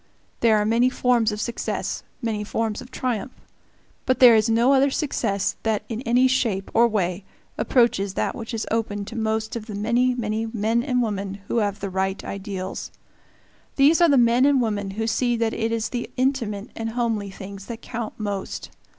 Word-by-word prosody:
There 225 Hz, -2 st, +4 dB
are 210 Hz, -, +1 dB
many 235 Hz, +3 st, +3 dB
forms 245 Hz, -4 st, +2 dB
of 210 Hz, -, -4 dB
success, 235 Hz, +2 st, -3 dB, 0.2 s
many 215 Hz, -2 st, -1 dB
forms 220 Hz, 0 st, -2 dB
of 250 Hz, -, -11 dB
triumph. 250 Hz, -2 st, -3 dB, 0.7 s
But 255 Hz, -, +3 dB
there 245 Hz, -2 st, +9 dB
is 220 Hz, +1 st, +3 dB
no 235 Hz, +4 st, +4 dB
other 275 Hz, +1 st, +4 dB
success 225 Hz, -, -1 dB
that 220 Hz, -2 st, 0 dB
in 225 Hz, 0 st, -3 dB
any 250 Hz, +2 st, +5 dB
shape 230 Hz, -7 st, 0 dB
or 235 Hz, +1 st, +5 dB
way 190 Hz, -4 st, -1 dB, 0.3 s
approaches 205 Hz, -6 st, +2 dB
that -, -, 0 dB
which 225 Hz, -1 st, -7 dB
is 225 Hz, -1 st, -3 dB
open 210 Hz, -3 st, -1 dB
to 225 Hz, -, -9 dB
most 220 Hz, 0 st, -1 dB
of 225 Hz, -1 st, -6 dB
the 210 Hz, -, -6 dB
many, 240 Hz, +4 st, +2 dB
many 220 Hz, -1 st, -2 dB
men 225 Hz, +1 st, 0 dB
and 250 Hz, -1 st, +1 dB
women 200 Hz, -2 st, -3 dB
who -, -, 0 dB
have 205 Hz, -2 st, 0 dB
the 195 Hz, -1 st, -3 dB
right 190 Hz, +1 st, -1 dB
ideals. 190 Hz, -1 st, -5 dB, 0.9 s
These 295 Hz, +5 st, +5 dB
are 340 Hz, -, +6 dB
the 280 Hz, -, +5 dB
men 240 Hz, +1 st, +4 dB
and 285 Hz, -2 st, +4 dB
the -, -, +2 dB
women 205 Hz, -3 st, -2 dB
who 225 Hz, -, 0 dB
see 240 Hz, +2 st, +1 dB
that 230 Hz, -1 st, 0 dB
it 225 Hz, 0 st, -1 dB
is 225 Hz, -1 st, -1 dB
the 240 Hz, -1 st, -4 dB
intimate 245 Hz, -5 st, -1 dB
and 225 Hz, 0 st, -3 dB
homely 225 Hz, -4 st, -1 dB
things 195 Hz, 0 st, -9 dB
that 235 Hz, -1 st, -7 dB
count 230 Hz, -2 st, -5 dB
most. 205 Hz, -2 st, -4 dB
225 Hz, 195 wpm, -23 LUFS, 205-240 Hz, 0.9 s, there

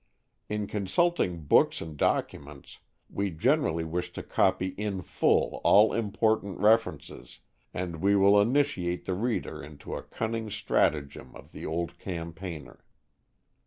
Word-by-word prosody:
In 105 Hz, 0 st, -2 dB
consulting 100 Hz, -, 0 dB
books 75 Hz, -, +3 dB
and 80 Hz, -2 st, -7 dB
documents 70 Hz, -1 st, -2 dB, 0.3 s
we 100 Hz, 0 st, -2 dB
generally 100 Hz, -, +1 dB
wish 90 Hz, +2 st, -3 dB
to -, -, -6 dB
copy 95 Hz, 0 st, +1 dB
in 100 Hz, -1 st, -4 dB
full -, -, +1 dB
all 105 Hz, +1 st, +6 dB
important 110 Hz, -2 st, 0 dB
references, 110 Hz, +3 st, 0 dB, 0.3 s
and 90 Hz, -2 st, -4 dB
we 100 Hz, +5 st, +2 dB
will 100 Hz, +1 st, +5 dB
initiate 110 Hz, -8 st, 0 dB
the 95 Hz, -, -1 dB
reader 100 Hz, -7 st, -2 dB
into 75 Hz, 0 st, -9 dB
a -, -, -4 dB
cunning 110 Hz, 0 st, -4 dB
stratagem 75 Hz, -8 st, -1 dB
of -, -, -14 dB
the -, -, -7 dB
old 85 Hz, +2 st, -3 dB
campaigner. 85 Hz, -3 st, -7 dB
95 Hz, 125 wpm, -28 LUFS, 85-105 Hz, 0.3 s, all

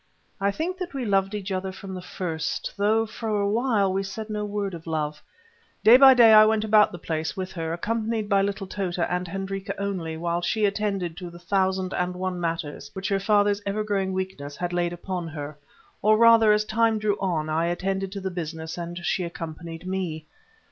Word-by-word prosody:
I 200 Hz, 0 st, +2 dB
think 340 Hz, -, -3 dB
that 355 Hz, -5 st, -5 dB
we 260 Hz, -3 st, -2 dB
loved 195 Hz, 0 st, +1 dB
each 200 Hz, -1 st, -5 dB
other 190 Hz, 0 st, -2 dB
from 190 Hz, 0 st, -9 dB
the 185 Hz, -, -6 dB
first, 165 Hz, -3 st, -4 dB
though 215 Hz, +2 st, +2 dB
for 215 Hz, -1 st, -3 dB
a 200 Hz, -, +1 dB
while 215 Hz, -3 st, +1 dB
we 195 Hz, -, 0 dB
said 210 Hz, +3 st, -6 dB
no 210 Hz, 0 st, -2 dB
word 205 Hz, -2 st, -3 dB
of 165 Hz, -1 st, -9 dB
love. 150 Hz, -1 st, -2 dB, 0.6 s
Day 230 Hz, -, +9 dB
by 265 Hz, 0 st, +9 dB
day 230 Hz, -3 st, +8 dB
I 215 Hz, 0 st, +10 dB
went 215 Hz, 0 st, +2 dB
about 215 Hz, -1 st, +5 dB
the 175 Hz, -, -7 dB
place 160 Hz, +2 st, -3 dB
with 185 Hz, 0 st, -4 dB
her, 165 Hz, -2 st, -4 dB
accompanied 220 Hz, +4 st, -2 dB
by 200 Hz, -1 st, +3 dB
little 200 Hz, 0 st, -2 dB
Tota 185 Hz, -3 st, -2 dB
and 180 Hz, 0 st, -2 dB
Hendrika 195 Hz, +2 st, -4 dB
only, 180 Hz, -5 st, -3 dB
while 170 Hz, +1 st, -1 dB
she 210 Hz, +5 st, +1 dB
attended 200 Hz, -4 st, -1 dB
to 180 Hz, -1 st, -6 dB
the 170 Hz, -, -12 dB
thousand 190 Hz, +1 st, 0 dB
and 180 Hz, 0 st, -1 dB
one 185 Hz, 0 st, -3 dB
matters 165 Hz, -3 st, -3 dB
which 190 Hz, +2 st, -3 dB
her 195 Hz, -1 st, +1 dB
father's 205 Hz, 0 st, +2 dB
ever 200 Hz, +2 st, -1 dB
growing 195 Hz, -2 st, -1 dB
weakness 185 Hz, -7 st, -4 dB
had 175 Hz, 0 st, -3 dB
laid 175 Hz, -1 st, 0 dB
upon 175 Hz, 0 st, -4 dB
her; 150 Hz, -1 st, -6 dB, 0.5 s
or 215 Hz, +1 st, +4 dB
rather, 230 Hz, -1 st, +7 dB
as 210 Hz, 0 st, +3 dB
time 225 Hz, 0 st, +2 dB
drew 210 Hz, -1 st, +1 dB
on, 170 Hz, -5 st, -1 dB
I 160 Hz, +2 st, 0 dB
attended 190 Hz, +2 st, -2 dB
to 200 Hz, -, -5 dB
the 190 Hz, 0 st, -3 dB
business, 160 Hz, -1 st, -5 dB
and 175 Hz, 0 st, -6 dB
she 185 Hz, -, 0 dB
accompanied 165 Hz, 0 st, -7 dB
me. 180 Hz, -5 st, -3 dB
190 Hz, 205 wpm, -25 LUFS, 175-210 Hz, 0.6 s, I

